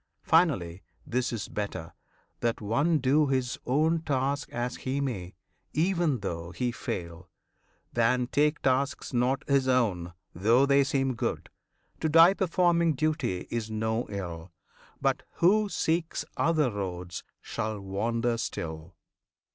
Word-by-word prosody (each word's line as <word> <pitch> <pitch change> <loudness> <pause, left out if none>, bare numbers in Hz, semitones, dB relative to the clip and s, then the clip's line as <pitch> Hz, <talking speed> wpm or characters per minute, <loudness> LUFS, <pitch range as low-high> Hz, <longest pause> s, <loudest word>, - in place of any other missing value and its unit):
Finally, 95 - +2 0.2
this 125 -2 -1
is 115 -4 -4
better, 100 -6 -5 0.5
that 115 -1 0
one 140 +11 +2
do 145 +3 +3
His 130 -2 -1
own 155 +5 +2
task 140 -1 -1
as 120 +1 -3
he 135 +2 -2
may, 100 -11 -3 0.4
even 170 - +1
though 85 -3 -4
he 120 +8 -2
fail, 90 -9 -6 0.6
Than 120 +2 +2
take 150 +4 +1
tasks 135 +2 0
not 125 +3 +1
his 140 -2 +3
own, 100 -10 +1 0.2
though 115 +9 +4
they 140 0 +4
seem 135 -1 0
good. 115 - -3 0.5
To 160 - 0
die 165 +4 +8
performing 170 -3 +2
duty 155 - -1
is 115 -2 -2
no 110 +2 -1
ill; 90 -4 -6 0.5
But - - +1
who 205 +4 +3
seeks 165 -2 -1
other 155 -6 +2
roads 90 -3 -5 0.2
shall 110 -1 -4
wander 115 +4 -1
still. 80 -5 -5
125 Hz, 130 wpm, -28 LUFS, 100-150 Hz, 0.6 s, die